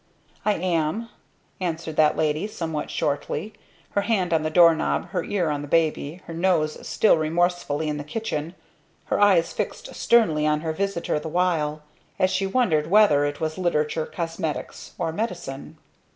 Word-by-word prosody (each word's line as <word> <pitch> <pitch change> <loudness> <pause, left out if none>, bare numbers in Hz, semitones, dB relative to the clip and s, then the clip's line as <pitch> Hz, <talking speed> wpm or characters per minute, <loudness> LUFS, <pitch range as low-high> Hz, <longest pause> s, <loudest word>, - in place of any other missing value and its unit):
"I 210 - +3
am," 180 +5 -1 0.5
answered 165 -3 -3
that 155 -1 +4
lady, 155 +5 0
somewhat 160 -7 -4
shortly, 155 +7 -2 0.4
her 200 - +1
hand 195 -5 0
on 160 - +3
the 155 - -1
doorknob, 165 +1 +4
her 180 -2 -2
ear 175 -6 0
on 145 -1 -2
the 145 - -7
baby, 160 +1 0
her 165 - -8
nose 165 -3 0
still 215 - +4
remorsefully 160 -1 0
in 150 -1 -2
the 145 - -5
kitchen, 165 -1 -4 0.6
her - - +1
eyes 185 -5 +4
fixed - - -4
sternly 160 -11 +3
on 150 0 +1
her 160 -1 -2
visitor 195 -3 -1
the 160 - -7
while; 155 -3 0 0.3
as 185 0 +2
she 195 +1 0
wondered 180 -9 +1
whether 185 -8 +5
it 145 0 -3
was 160 +2 -3
literature, 155 -3 0
cosmetics, 165 -3 -5
or 165 -2 -1
medicine. 175 -9 -5
165 Hz, 160 wpm, -24 LUFS, 155-185 Hz, 0.6 s, whether